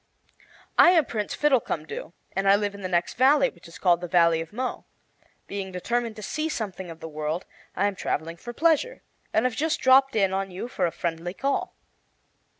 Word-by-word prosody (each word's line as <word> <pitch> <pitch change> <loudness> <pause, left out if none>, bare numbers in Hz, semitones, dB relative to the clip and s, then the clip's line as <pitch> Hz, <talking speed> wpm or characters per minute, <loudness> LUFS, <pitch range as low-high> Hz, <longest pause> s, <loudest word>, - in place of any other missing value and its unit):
"I - - +9
am 315 - +4
Prince 210 -4 -3
Fiddlecumdoo, 225 - -1 0.2
and 195 0 +1
I 200 - +8
live 205 0 -1
in 200 - -10
the 185 - -3
next 175 -1 0
valley, 270 +2 +5
which 170 -1 -17
is 165 - -12
called 175 -2 +3
the 175 - -4
Valley 170 -1 +4
of 165 - -8
Mo. 255 +4 -4 0.6
Being 195 -1 -5
determined 230 +5 -2
to 215 - -9
see 310 +9 -2
something 190 - -4
of 165 0 -10
the 160 - -6
world, 155 +2 -3 0.3
I 195 - +1
am 205 - +1
traveling 165 -2 -3
for 240 - -8
pleasure, 330 - +1 0.3
and 220 - +2
have 250 -3 0
just 315 +2 0
dropped 265 0 +5
in 195 -3 +2
on 195 0 -1
you 185 +6 -6
for 245 - 0
a - - -3
friendly 170 +2 -4
call." 275 +5 -1
200 Hz, 200 wpm, -26 LUFS, 175-255 Hz, 0.6 s, I